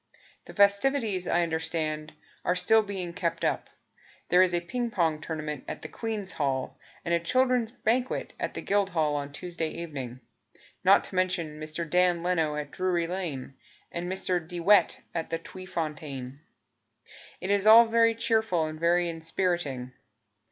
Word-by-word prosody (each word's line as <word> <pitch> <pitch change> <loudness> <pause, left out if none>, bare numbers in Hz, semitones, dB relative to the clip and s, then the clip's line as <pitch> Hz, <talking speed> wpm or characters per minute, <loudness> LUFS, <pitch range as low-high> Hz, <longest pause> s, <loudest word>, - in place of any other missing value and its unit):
The - - -12
festivities, 200 -1 +3
I 175 - +2
understand, 160 -2 -2 0.3
Are 180 - +1
still 220 +4 +5
being 190 -4 -5
kept 175 -4 -2
up. - - -1 0.6
There 180 - +6
is 185 -1 +4
a - - +2
ping 240 +8 -3
pong 165 -7 0
tournament 155 -3 -4
at - - -6
the - - -5
Queen's 215 -4 -3
Hall 135 -3 -2 0.3
And 170 - 0
a 170 - +3
children's 250 +5 +2
banquet 245 +2 -1
At - - -3
the - - -5
Guildhall 185 -7 +1
on 145 -1 -3
Tuesday 170 +1 -4
evening; 135 -8 -6 0.6
Not - - +6
to - - -5
mention 180 -5 -1
Mr. 155 +2 -4
Dan 180 +1 +2
Leno 165 -4 +1
at 150 -1 -5
Drury 180 -2 0
Lane 165 -8 -4 0.4
And 175 +1 -4
Mr. 185 -2 0
De 175 0 -5
Wet 200 +4 +4
at 165 -1 -3
the 165 - -1
Tweefontein. 150 -7 -6 1.0
It 190 - -2
is 205 +1 +2
all 230 +2 +10
very 230 0 +3
cheerful 220 -8 +1
And 155 0 -6
very 175 +1 +3
inspiriting. 165 -6 -2
175 Hz, 155 wpm, -28 LUFS, 155-195 Hz, 1.0 s, all